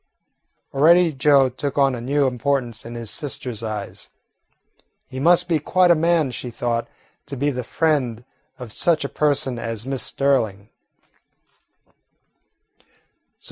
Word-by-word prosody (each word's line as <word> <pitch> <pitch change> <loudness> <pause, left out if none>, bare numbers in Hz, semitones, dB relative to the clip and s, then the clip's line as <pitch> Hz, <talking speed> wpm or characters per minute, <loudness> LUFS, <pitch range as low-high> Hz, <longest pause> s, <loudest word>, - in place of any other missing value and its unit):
Already 165 +4 +4
Joe 135 0 +4
took 130 +3 -5
on 135 -2 +3
a 120 - -5
new 140 +3 +1
importance 125 -2 -1
in 120 +1 -8
his 115 -2 -4
sister's 130 -7 -4
eyes. 110 -3 -6 1.0
He 130 - -8
must 175 +4 +4
be 165 -3 +1
quite 180 +4 +3
a - - +6
man, 165 -3 +1
she 125 - -5
thought, 115 0 -2 0.4
to 140 - -6
be 145 +3 0
the 125 -2 -4
friend 125 -5 -1 0.3
of 125 -5 -9
such 160 -4 +1
a - - -1
person 145 -4 0
as 115 -1 -4
Miss 135 -1 -1
Sterling. 110 -8 0
135 Hz, 135 wpm, -21 LUFS, 120-150 Hz, 1.0 s, a